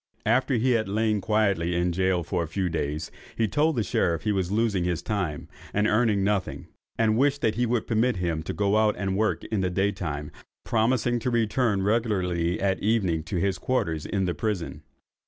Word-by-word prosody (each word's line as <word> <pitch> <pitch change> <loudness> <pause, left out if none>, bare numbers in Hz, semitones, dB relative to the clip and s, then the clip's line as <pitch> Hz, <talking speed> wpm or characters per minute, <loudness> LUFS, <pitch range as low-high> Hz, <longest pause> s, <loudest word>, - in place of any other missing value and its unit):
After 130 +4 +2
he 125 +3 +2
had 110 -4 +1
lain 105 0 +1
quietly 100 -5 +1
in 85 0 +1
gaol 90 -1 0
a 85 -3 0
few 90 +2 -1
days, 75 -1 -3 0.3
he 115 - +2
told 150 +7 +1
the 115 - +1
sheriff 85 -4 0
that - - -1
he - - +3
was 95 -2 -1
losing 105 -4 +1
his 85 -2 -1
time, 95 -9 -3 0.3
and 105 +1 +2
earning 110 -2 +2
nothing, 100 -1 -1 0.3
and 110 0 +2
wished 145 +1 +2
that 110 - +2
he 120 +2 0
would 120 -1 0
permit 115 +1 +1
him 85 -4 -1
to 80 - -5
go 100 +1 +1
out 110 -1 +3
and 95 -1 -1
work 110 +2 0
in 110 -3 -2
the 90 - 0
day 95 +3 +1
time, 75 -6 -5 0.3
promising 120 +1 +1
to 120 - -1
return 115 -3 +1
regularly 95 -6 0
at 95 -1 0
evening 100 -7 +1
to 95 - -4
his 95 +1 0
quarters 85 -12 -1
in 95 -2 0
the 90 - 0
prison. 85 -3 -3
100 Hz, 200 wpm, -26 LUFS, 90-110 Hz, 0.3 s, he